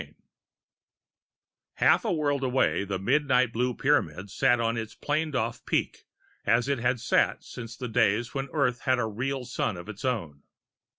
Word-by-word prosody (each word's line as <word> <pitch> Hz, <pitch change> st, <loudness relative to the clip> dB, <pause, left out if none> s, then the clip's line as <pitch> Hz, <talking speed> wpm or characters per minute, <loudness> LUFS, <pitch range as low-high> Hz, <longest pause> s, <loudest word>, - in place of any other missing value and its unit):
IV -, -, -15 dB, 1.6 s
Half -, -, +4 dB
a 220 Hz, -, +1 dB
world 145 Hz, -4 st, 0 dB
away, 130 Hz, -5 st, +1 dB
the 100 Hz, -1 st, -3 dB
midnight 130 Hz, +2 st, +2 dB
blue 125 Hz, +1 st, 0 dB
Pyramid 100 Hz, -, 0 dB
sat 120 Hz, +3 st, +3 dB
on 115 Hz, 0 st, 0 dB
its 110 Hz, -1 st, -5 dB
planed 150 Hz, 0 st, -1 dB
off 115 Hz, -1 st, -2 dB
peak -, -, -2 dB, 0.4 s
as 120 Hz, +2 st, +2 dB
it 140 Hz, -3 st, 0 dB
had 125 Hz, +1 st, +1 dB
sat 115 Hz, -, +1 dB
since 115 Hz, -2 st, -9 dB
the 125 Hz, -, -4 dB
days 115 Hz, 0 st, +1 dB
when 135 Hz, 0 st, -3 dB
Earth 125 Hz, -5 st, +1 dB
had 130 Hz, -1 st, +3 dB
a 120 Hz, -, 0 dB
real 125 Hz, +4 st, -3 dB
sun 115 Hz, -5 st, -2 dB
of 85 Hz, -, -9 dB
its 105 Hz, -1 st, -8 dB
own. 85 Hz, -, -2 dB
125 Hz, 170 wpm, -27 LUFS, 110-135 Hz, 1.6 s, Half